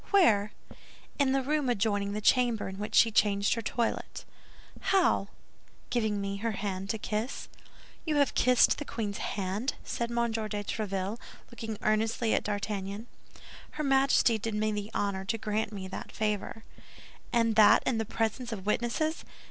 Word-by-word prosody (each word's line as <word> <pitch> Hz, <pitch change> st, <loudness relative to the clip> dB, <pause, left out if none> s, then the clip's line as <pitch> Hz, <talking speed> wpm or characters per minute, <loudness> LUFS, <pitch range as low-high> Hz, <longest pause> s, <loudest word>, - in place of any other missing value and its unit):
"Where?" 215 Hz, -, +4 dB, 0.7 s
"In 275 Hz, -2 st, +3 dB
the 270 Hz, 0 st, +1 dB
room 295 Hz, -1 st, 0 dB
adjoining 205 Hz, -3 st, 0 dB
the 210 Hz, -, -3 dB
chamber 240 Hz, -1 st, +3 dB
in 190 Hz, 0 st, -7 dB
which 210 Hz, +1 st, -4 dB
she 225 Hz, -, +6 dB
changed 205 Hz, -1 st, +3 dB
her 230 Hz, -, -2 dB
toilet." 230 Hz, +1 st, -2 dB, 0.5 s
"How?" 370 Hz, -, +2 dB, 0.6 s
"Giving 220 Hz, -4 st, 0 dB
me 200 Hz, 0 st, -3 dB
her 225 Hz, +2 st, -2 dB
hand 195 Hz, -1 st, -4 dB
to 220 Hz, -, 0 dB
kiss." 215 Hz, +4 st, -3 dB, 0.6 s
"You 310 Hz, -2 st, -1 dB
have 285 Hz, -2 st, +3 dB
kissed 250 Hz, -1 st, +4 dB
the -, -, -3 dB
queen's 210 Hz, -7 st, -4 dB
hand?" 200 Hz, +6 st, -2 dB
said 235 Hz, 0 st, -3 dB
M. 235 Hz, -1 st, 0 dB
de 225 Hz, 0 st, -2 dB
Tréville, 205 Hz, 0 st, -3 dB, 0.3 s
looking 225 Hz, -2 st, -6 dB
earnestly 220 Hz, +1 st, +1 dB
at -, -, +1 dB
D'Artagnan. 205 Hz, 0 st, -3 dB, 0.7 s
"Her 305 Hz, -, -3 dB
Majesty 270 Hz, -4 st, +3 dB
did 220 Hz, +1 st, -3 dB
me 215 Hz, 0 st, +1 dB
the 205 Hz, 0 st, -4 dB
honor 200 Hz, -2 st, -1 dB
to 225 Hz, +3 st, -1 dB
grant 215 Hz, 0 st, -2 dB
me 195 Hz, -3 st, -6 dB
that -, -, -7 dB
favor." 215 Hz, +1 st, -2 dB, 0.7 s
"And 230 Hz, -2 st, +2 dB
that 215 Hz, -1 st, +7 dB
in 235 Hz, -3 st, +1 dB
the -, -, +1 dB
presence 225 Hz, +2 st, -2 dB
of 200 Hz, -4 st, -6 dB
witnesses! 240 Hz, +9 st, 0 dB
220 Hz, 160 wpm, -29 LUFS, 205-235 Hz, 0.7 s, that